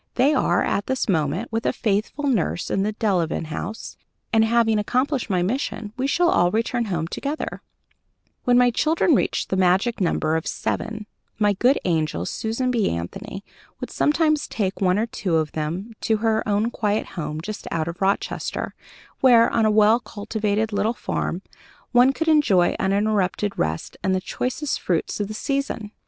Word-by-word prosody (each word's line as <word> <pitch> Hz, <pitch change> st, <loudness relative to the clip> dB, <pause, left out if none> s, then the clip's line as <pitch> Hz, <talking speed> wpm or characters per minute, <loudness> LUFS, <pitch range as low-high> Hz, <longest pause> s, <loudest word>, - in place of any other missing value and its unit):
They 270 Hz, +5 st, +4 dB
are, 270 Hz, -, +2 dB
at 200 Hz, -, -1 dB
this 260 Hz, -1 st, -1 dB
moment, 170 Hz, +4 st, 0 dB
with 225 Hz, +1 st, -1 dB
a -, -, +3 dB
faithful 215 Hz, +7 st, -1 dB
nurse 215 Hz, -, 0 dB
at 195 Hz, -, +1 dB
the 210 Hz, +2 st, 0 dB
Delevan 185 Hz, -7 st, 0 dB
House, 210 Hz, +7 st, -6 dB, 0.4 s
and, 220 Hz, 0 st, +5 dB
having 225 Hz, -1 st, +3 dB
accomplished 255 Hz, +4 st, 0 dB
my 180 Hz, -3 st, +1 dB
mission, 215 Hz, -1 st, -3 dB
we 260 Hz, +1 st, -1 dB
shall 345 Hz, +4 st, +3 dB
all 175 Hz, -, +3 dB
return 230 Hz, +3 st, 0 dB
home 170 Hz, -6 st, -2 dB
together." 285 Hz, -, -4 dB, 0.8 s
When 245 Hz, 0 st, +4 dB
my 245 Hz, 0 st, +5 dB
children 315 Hz, +6 st, +2 dB
reached -, -, 0 dB
the 190 Hz, -, 0 dB
magic 190 Hz, +5 st, +2 dB
number 160 Hz, -3 st, +1 dB
of 160 Hz, -, -2 dB
seven, 220 Hz, -1 st, -3 dB, 0.3 s
my 205 Hz, -1 st, +3 dB
good 250 Hz, +8 st, +3 dB
angel, 155 Hz, -, 0 dB
Susan 230 Hz, -, -2 dB
B. 230 Hz, -5 st, +1 dB
Anthony, 195 Hz, -, -5 dB, 0.4 s
would -, -, -6 dB
sometimes 305 Hz, 0 st, +2 dB
take 195 Hz, -3 st, -2 dB
one 185 Hz, 0 st, +3 dB
or 220 Hz, -, +1 dB
two 190 Hz, -6 st, -2 dB
of 155 Hz, -2 st, +1 dB
them 170 Hz, +9 st, -4 dB
to 220 Hz, -, +1 dB
her 220 Hz, 0 st, +1 dB
own 210 Hz, +3 st, +1 dB
quiet 210 Hz, -1 st, -1 dB
home, 155 Hz, -3 st, -5 dB
just 210 Hz, +6 st, -6 dB
out 160 Hz, -1 st, -2 dB
of 170 Hz, +2 st, -6 dB
Rochester, 195 Hz, +1 st, -1 dB, 0.5 s
where, 240 Hz, -3 st, +6 dB
on 225 Hz, -2 st, +3 dB
a -, -, +3 dB
well 215 Hz, +2 st, +5 dB
cultivated 215 Hz, -1 st, -2 dB
little 205 Hz, +3 st, +1 dB
farm, 185 Hz, -4 st, -3 dB, 0.5 s
one 245 Hz, +2 st, +6 dB
could 325 Hz, +4 st, -3 dB
enjoy 235 Hz, -, +4 dB
uninterrupted 200 Hz, 0 st, 0 dB
rest 80 Hz, +1 st, -3 dB
and 190 Hz, 0 st, +1 dB
the -, -, +1 dB
choicest 255 Hz, +8 st, -2 dB
fruits 175 Hz, +2 st, -1 dB
of 205 Hz, -, -1 dB
the 215 Hz, -, -6 dB
season. 275 Hz, -5 st, -2 dB
215 Hz, 175 wpm, -23 LUFS, 185-240 Hz, 0.8 s, where